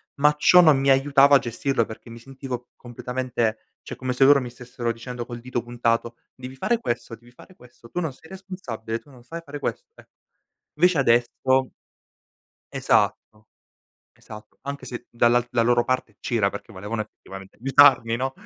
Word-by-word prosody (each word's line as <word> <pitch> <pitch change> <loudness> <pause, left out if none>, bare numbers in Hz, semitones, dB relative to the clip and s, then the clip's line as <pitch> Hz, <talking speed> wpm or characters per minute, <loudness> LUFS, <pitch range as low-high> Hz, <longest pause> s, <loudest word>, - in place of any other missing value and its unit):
ma 150 +1 +3
ciò 180 +4 +6
non 155 -5 +6
mi 135 0 +1
aiutava 140 +1 +5
a - - +6
gestirlo 120 0 -1
perché 110 +2 -11
mi 115 0 -10
sentivo 130 -1 -7
completamente 120 -2 -4
cioè - - -8
come 130 0 -3
se 135 +2 +3
loro 140 -1 +6
mi 125 - -6
stessero 120 -1 -5
dicendo 120 +1 -7
col 120 -1 -8
dito 125 0 -4
puntato: 120 -1 -1 0.2
"Devi 130 +1 -9
fare 235 - 0
questo, 120 - -4
devi 120 +1 -20
fare 180 +8 -17
questo, 120 -1 -18
tu 180 - -3
non 160 -4 -2
sei 160 - -18
responsabile, 180 - -6
tu 145 - -23
non 125 -3 -17
sai 165 +5 -8
fare 145 0 -7
questo", - - -4
eh. - - -18 0.7
Invece 175 +1 +3
adesso 130 +1 +2 1.0
Esatto. 110 0 0 0.7
Esatto, 110 -1 -13
anche 140 -1 -6
se 120 -1 -8
dalla 120 +1 +2
la 115 - +2
loro 120 0 +3
parte 130 -5 -2
c'era 110 -5 +1
perché 100 +2 -9
volevano 105 +3 -4
effettivamente 95 -2 -12
aiutarmi, 130 -2 +5
no? 130 +2 -2
125 Hz, 170 wpm, -24 LUFS, 115-135 Hz, 1.0 s, ciò